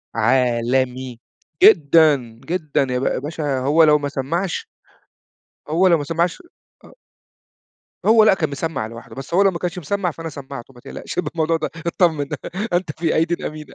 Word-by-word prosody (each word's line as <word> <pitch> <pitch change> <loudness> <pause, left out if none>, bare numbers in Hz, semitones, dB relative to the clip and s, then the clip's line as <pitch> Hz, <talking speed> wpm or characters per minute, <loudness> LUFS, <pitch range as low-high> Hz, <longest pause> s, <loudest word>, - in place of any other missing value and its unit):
عالمي 125 +1 0 0.4
جدًا 155 -4 +6 0.3
جدًا 155 -5 -1
يا 125 0 -1
ب 135 - -2
يا - - 0
باشا 145 -2 -3
هو 150 +5 +4
لو 150 -1 +6
ما 145 0 -3
سمّعش 165 +7 -3 1.0
هو 180 +4 +3
لو 170 -2 +5
ما 145 - -4
سمّعش 170 - -1 0.4
آه - - -16 1.1
هو 220 0 +6
لأ 215 - +6
كان 155 -5 -1
مسمّع 140 -6 -3
لوحده، 115 +1 -11
بس 135 +5 -8
هو 190 - +4
لو 195 - +4
ما 170 - -6
كانش 180 0 -3
مسمّع، 180 +2 -2
فأنا 165 +1 -7
سمّعته. 135 -3 -9
ما 120 - -16
تقلقش 180 - -7
من 160 - -2
الموضوع 165 0 +1
ده 155 - -3 0.2
اتطمن، 160 -5 +1 0.5
أنت 175 -3 0
في 165 -2 0
أيديٍ 165 +2 0
أمينة 155 0 -10
155 Hz, 170 wpm, -20 LUFS, 135-170 Hz, 1.1 s, جدًا